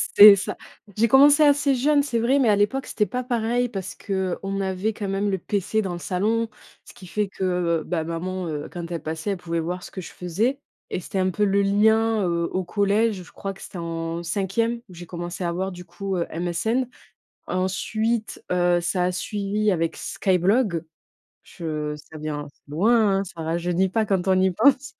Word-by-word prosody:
c'est 205 Hz, 0 st, +11 dB
ça. 195 Hz, -, -4 dB, 0.4 s
J'ai 230 Hz, +2 st, +4 dB
commencé 285 Hz, +4 st, +7 dB
assez 285 Hz, -1 st, +4 dB
jeune, 285 Hz, +3 st, +3 dB
c'est 240 Hz, -5 st, -1 dB
vrai, 260 Hz, +5 st, +3 dB
mais 240 Hz, -5 st, +4 dB
à 205 Hz, -, +5 dB
l'époque, 210 Hz, +7 st, +1 dB
c'était 210 Hz, -, +1 dB
pas 250 Hz, +3 st, -3 dB
pareil 240 Hz, 0 st, 0 dB
parce 190 Hz, -4 st, -5 dB
qu'on 195 Hz, 0 st, -2 dB
avait 190 Hz, +3 st, -1 dB
quand 205 Hz, -1 st, -4 dB
même 195 Hz, +1 st, 0 dB
le 190 Hz, -, 0 dB
PC 205 Hz, +3 st, -1 dB
dans 190 Hz, -4 st, -3 dB
le 175 Hz, -, -5 dB
salon, 220 Hz, +6 st, 0 dB, 0.4 s
ce -, -, -14 dB
qui 185 Hz, -, -13 dB
fait 210 Hz, +3 st, -1 dB
que, 180 Hz, -4 st, 0 dB
bah, 165 Hz, -2 st, -1 dB
maman, 175 Hz, +2 st, -4 dB
heu, 150 Hz, -1 st, -4 dB
quand 175 Hz, -1 st, -6 dB
elle 170 Hz, -, -3 dB
passait, 160 Hz, +5 st, -3 dB
elle 195 Hz, -, -2 dB
pouvait 170 Hz, -1 st, -3 dB
voir 180 Hz, +2 st, -3 dB
ce -, -, -10 dB
que 190 Hz, -, -6 dB
je -, -, -9 dB
faisais 215 Hz, +10 st, -1 dB, 0.3 s
et -, -, -2 dB
c'était 190 Hz, +2 st, -4 dB
un 185 Hz, -, +2 dB
peu 210 Hz, +4 st, 0 dB
le 200 Hz, 0 st, +3 dB
lien, 220 Hz, +2 st, +3 dB
heu, 170 Hz, -1 st, 0 dB
au 185 Hz, 0 st, -1 dB
collège. 205 Hz, +3 st, +1 dB
Je -, -, -16 dB
crois 195 Hz, 0 st, -5 dB
que 195 Hz, -, -16 dB
c'était 185 Hz, -, -9 dB
en 165 Hz, 0 st, -4 dB
cinquième 205 Hz, +7 st, -1 dB
où -, -, -12 dB
j'ai 175 Hz, 0 st, -9 dB
commencé 175 Hz, +1 st, -5 dB
à 170 Hz, -, 0 dB
avoir, 190 Hz, +3 st, -2 dB
du 180 Hz, -1 st, -10 dB
coup, 190 Hz, +2 st, -4 dB
heu, 170 Hz, -, -1 dB
MSN. 180 Hz, +9 st, -1 dB, 0.6 s
Ensuite, 215 Hz, +5 st, -1 dB
heu, 175 Hz, -1 st, +3 dB
ça 180 Hz, +1 st, 0 dB
a 180 Hz, -, +1 dB
suivi 205 Hz, +2 st, -1 dB
avec 165 Hz, -3 st, 0 dB
Skyblog. 190 Hz, -1 st, +1 dB, 0.6 s
Je 155 Hz, -3 st, -4 dB
ça 150 Hz, +1 st, -12 dB
vient 150 Hz, -1 st, -4 dB
c'est -, -, -38 dB
loin, 205 Hz, +3 st, +3 dB
hein, -, -, -1 dB
ça 170 Hz, -3 st, -9 dB
rajeunit 175 Hz, +3 st, 0 dB
pas 220 Hz, +3 st, +1 dB
quand 195 Hz, -2 st, 0 dB
on 185 Hz, 0 st, +4 dB
y 190 Hz, 0 st, +3 dB
pense. 275 Hz, -, +3 dB
190 Hz, 205 wpm, -24 LUFS, 175-220 Hz, 0.6 s, c'est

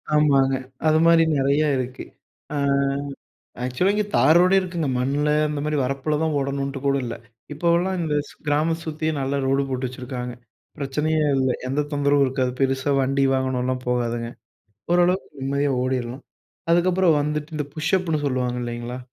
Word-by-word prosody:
ஆமாங்க. 135 Hz, -3 st, +4 dB, 0.3 s
அதுமாரி 165 Hz, +1 st, +5 dB
நிறையா 140 Hz, +3 st, +2 dB
இருக்கு. 130 Hz, 0 st, -4 dB, 0.5 s
அ -, -, -2 dB, 1.1 s
ஆக்சுவலா 130 Hz, +11 st, +1 dB
இங்க 210 Hz, 0 st, +1 dB
தாரோடே 175 Hz, +6 st, +5 dB
இருக்குங்க. 175 Hz, -5 st, -3 dB
மண்ல, 140 Hz, +4 st, 0 dB, 0.2 s
அந்த 150 Hz, -1 st, -3 dB
மாரி 150 Hz, 0 st, 0 dB
வரப்பில 135 Hz, +3 st, -1 dB
தான் 160 Hz, -2 st, 0 dB
ஓடணுன்ட்டு 140 Hz, 0 st, -2 dB
கூட 140 Hz, 0 st, +3 dB
இல்ல. 120 Hz, -, -4 dB, 0.4 s
இப்போவெல்லாம் 170 Hz, +4 st, +1 dB
இந்த 160 Hz, -3 st, -1 dB
ஸ் -, -, -14 dB
கிராம 155 Hz, +3 st, +1 dB
சுத்தியே 155 Hz, 0 st, -2 dB
நல்ல 135 Hz, +1 st, -1 dB
ரோடு 135 Hz, +1 st, +2 dB
போட்டு 130 Hz, 0 st, -2 dB
வச்சுருக்காங்க. 125 Hz, -1 st, -6 dB, 0.4 s
பிரச்சனையே 150 Hz, +3 st, 0 dB, 0.2 s
இல்ல. 130 Hz, -1 st, +1 dB, 0.2 s
எந்த 145 Hz, +2 st, 0 dB
தொந்தரவும் 145 Hz, 0 st, +3 dB
இருக்காது. 130 Hz, -1 st, 0 dB
பெருசா 135 Hz, +1 st, +1 dB
வண்டி, 135 Hz, +1 st, +1 dB
வாகனம்லாம் 130 Hz, -1 st, -1 dB
போகாதுங்க. 120 Hz, -1 st, -1 dB, 0.6 s
ஓரளவுக்கு 175 Hz, -4 st, +1 dB
நிம்மதியா 140 Hz, +1 st, 0 dB
ஓடிரலாம். 130 Hz, 0 st, -3 dB, 0.5 s
அதுக்கப்புறம் 175 Hz, -1 st, +3 dB
வந்துட்டு 150 Hz, +1 st, -3 dB
இந்த 150 Hz, -, -2 dB
புஷ்ஷப்புன்னு 160 Hz, -1 st, 0 dB
சொல்லுவாங்க, 125 Hz, -2 st, -1 dB
இல்லைங்களா? 120 Hz, +1 st, -5 dB
140 Hz, 140 wpm, -23 LUFS, 130-155 Hz, 1.1 s, அதுமாரி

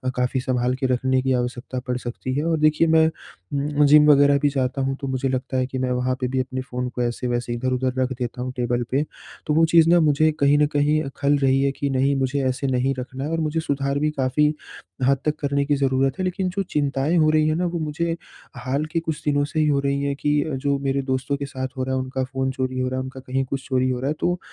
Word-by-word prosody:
काफ़ी 125 Hz, +1 st, 0 dB
सँभाल 125 Hz, -1 st, 0 dB
के 135 Hz, +1 st, -3 dB
रखने 130 Hz, +1 st, +1 dB
की 130 Hz, 0 st, +1 dB
आवश्यकता 125 Hz, +1 st, -3 dB
पड़ 125 Hz, -, -1 dB
सकती 125 Hz, +1 st, -5 dB
है। 145 Hz, -, 0 dB
और 165 Hz, -1 st, +1 dB
देखिए 155 Hz, +2 st, +3 dB
मैं 160 Hz, 0 st, +5 dB
उम्म, 145 Hz, -, -2 dB
जिम 150 Hz, +1 st, +7 dB
वग़ैरह 140 Hz, 0 st, +5 dB
भी 145 Hz, 0 st, +2 dB
जाता 135 Hz, -1 st, -1 dB
हूँ 135 Hz, 0 st, -1 dB
तो 135 Hz, -, -3 dB
मुझे 130 Hz, 0 st, -1 dB
लगता 130 Hz, 0 st, -2 dB
है 130 Hz, -, +1 dB
कि 130 Hz, -, -5 dB
मैं 130 Hz, -1 st, -1 dB
वहाँ 125 Hz, +1 st, 0 dB
पे 125 Hz, -, +1 dB
भी 130 Hz, +1 st, -1 dB
अपने 130 Hz, 0 st, -3 dB
फ़ोन 125 Hz, -1 st, -4 dB
को 125 Hz, -, -5 dB
ऐसे-वैसे 120 Hz, 0 st, -2 dB
इधर-उधर 130 Hz, +1 st, -1 dB
रख 130 Hz, 0 st, 0 dB
देता 125 Hz, 0 st, -4 dB
हूँ 130 Hz, +1 st, -3 dB
टेबल 120 Hz, 0 st, 0 dB
पे 135 Hz, +3 st, +2 dB, 0.4 s
तो 150 Hz, -, +2 dB
वो 165 Hz, +2 st, +5 dB
चीज़ 165 Hz, 0 st, +5 dB
ना 175 Hz, 0 st, +6 dB
मुझे 155 Hz, +1 st, +3 dB
कहीं 140 Hz, +1 st, +4 dB
न 150 Hz, -, +4 dB
कहीं 150 Hz, +1 st, +3 dB, 0.2 s
खल 145 Hz, +1 st, +2 dB
रही 135 Hz, 0 st, +2 dB
है। 140 Hz, -, +2 dB
कि 140 Hz, +1 st, -2 dB
नहीं, 135 Hz, +1 st, +1 dB
मुझे 135 Hz, +1 st, 0 dB
ऐसे 130 Hz, +2 st, -1 dB
नहीं 130 Hz, +1 st, +1 dB
रखना 130 Hz, +2 st, -6 dB
है 150 Hz, -, -3 dB
और 165 Hz, -, 0 dB
मुझे 155 Hz, 0 st, -1 dB
सुधार 140 Hz, -2 st, -1 dB
भी 150 Hz, -, +1 dB
काफ़ी 150 Hz, +2 st, +1 dB, 0.5 s
हद 140 Hz, 0 st, +4 dB
तक 150 Hz, -1 st, +1 dB
करने 140 Hz, 0 st, 0 dB
की 145 Hz, 0 st, +2 dB
ज़रूरत 135 Hz, -1 st, +1 dB
है। 185 Hz, -, 0 dB
लेकिन 185 Hz, 0 st, -1 dB
जो 195 Hz, +1 st, -1 dB
चिंताएँ 145 Hz, +2 st, 0 dB
हो 155 Hz, -1 st, +4 dB
रही 155 Hz, 0 st, +3 dB
हैं 155 Hz, -, +1 dB
ना 180 Hz, -, 0 dB
वो 170 Hz, -1 st, -2 dB
मुझे 165 Hz, +2 st, -2 dB, 0.4 s
हाल 130 Hz, +4 st, -2 dB
के 165 Hz, -, +1 dB
कुछ 160 Hz, -2 st, -4 dB
दिनों 145 Hz, -1 st, +2 dB
से 155 Hz, +2 st, -3 dB
ही 155 Hz, -, +3 dB
हो 140 Hz, -1 st, +2 dB
रही 140 Hz, 0 st, 0 dB
है। 140 Hz, 0 st, 0 dB
कि 145 Hz, +1 st, +1 dB, 0.2 s
जो 140 Hz, -1 st, +1 dB
मेरे 140 Hz, 0 st, 0 dB
दोस्तों 130 Hz, +1 st, -1 dB
के 140 Hz, -, -4 dB
साथ 130 Hz, -1 st, -4 dB
हो 130 Hz, -, -1 dB
रहा 130 Hz, 0 st, -1 dB
है 130 Hz, -, 0 dB
उनका 130 Hz, 0 st, -3 dB
फ़ोन 130 Hz, 0 st, -2 dB
चोरी 130 Hz, -1 st, -3 dB
हो 130 Hz, -, 0 dB
रहा 130 Hz, -, -3 dB
है -, -, -2 dB
उनका 130 Hz, 0 st, -8 dB
कहीं 130 Hz, +1 st, -2 dB
कुछ 135 Hz, 0 st, -5 dB
चोरी 130 Hz, -1 st, +1 dB
हो 125 Hz, -1 st, -1 dB
रहा 130 Hz, -, -2 dB
है। -, -, +1 dB
तो, 175 Hz, 0 st, 0 dB
135 Hz, 260 wpm, -23 LUFS, 130-150 Hz, 0.5 s, जिम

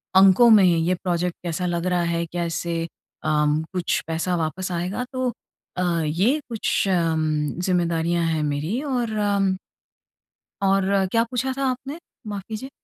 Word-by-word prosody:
अंकों 195 Hz, +5 st, +7 dB
में 215 Hz, -3 st, +7 dB
ये 175 Hz, 0 st, +3 dB
प्रोजेक्ट 175 Hz, -1 st, -1 dB
कैसा 175 Hz, +1 st, -2 dB
लग 175 Hz, -1 st, -1 dB
रहा 180 Hz, -1 st, +1 dB
है? 170 Hz, 0 st, -1 dB
क्या 170 Hz, +1 st, -3 dB
इससे 165 Hz, 0 st, -2 dB, 0.4 s
अम, 150 Hz, 0 st, +2 dB
कुछ 180 Hz, -2 st, 0 dB
पैसा 165 Hz, +2 st, -1 dB
वापस 175 Hz, +3 st, -2 dB
आएगा? 180 Hz, +8 st, -2 dB
तो 255 Hz, -1 st, 0 dB, 0.5 s
अ, 180 Hz, -, 0 dB, 0.2 s
ये 195 Hz, -, +2 dB
कुछ 220 Hz, -3 st, 0 dB
अम, 165 Hz, -3 st, +1 dB, 0.4 s
जिम्मेदारियाँ 170 Hz, -1 st, +1 dB
है 160 Hz, -1 st, 0 dB
मेरी 150 Hz, -, -1 dB
और 250 Hz, -5 st, -1 dB, 0.2 s
अम 195 Hz, -2 st, +2 dB, 1.1 s
और 195 Hz, 0 st, +2 dB
क्या 230 Hz, 0 st, +3 dB
पूछा 255 Hz, +1 st, -1 dB
था 275 Hz, -, 0 dB
आपने? 265 Hz, +5 st, -5 dB, 0.3 s
माफ़ 205 Hz, -2 st, -4 dB
कीजिए। 225 Hz, +4 st, -6 dB
180 Hz, 150 wpm, -23 LUFS, 170-210 Hz, 1.1 s, अंकों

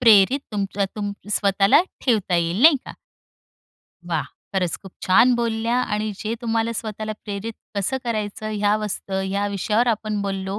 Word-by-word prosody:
प्रेरित 230 Hz, +3 st, +6 dB
तुमचा 200 Hz, -1 st, -1 dB
तुम 205 Hz, -1 st, -2 dB, 0.2 s
स्वतःला 200 Hz, -, +4 dB, 0.2 s
ठेवता 210 Hz, -8 st, +2 dB
येईल 170 Hz, +7 st, 0 dB
नाही 315 Hz, -2 st, +8 dB
का. -, -, -7 dB, 1.2 s
वाह! -, -, +1 dB, 0.3 s
खरंच 180 Hz, -3 st, +1 dB
खूप 195 Hz, -2 st, -11 dB
छान 240 Hz, +7 st, +5 dB
बोलल्या! 230 Hz, 0 st, 0 dB
आणि 215 Hz, -2 st, -1 dB
जे 220 Hz, +3 st, -3 dB
तुम्हाला 230 Hz, -1 st, 0 dB
स्वतःला 215 Hz, -1 st, -4 dB
प्रेरित 205 Hz, +2 st, -4 dB, 0.2 s
कसं 200 Hz, +7 st, 0 dB
करायचं 215 Hz, -2 st, -3 dB
ह्या 210 Hz, 0 st, +2 dB
वस्त 210 Hz, -2 st, -4 dB, 0.2 s
या 200 Hz, +1 st, 0 dB
विषयावर 210 Hz, +4 st, +1 dB
आपण 215 Hz, -2 st, -1 dB
बोललो. 195 Hz, 0 st, -3 dB
210 Hz, 145 wpm, -22 LUFS, 200-225 Hz, 1.2 s, नाही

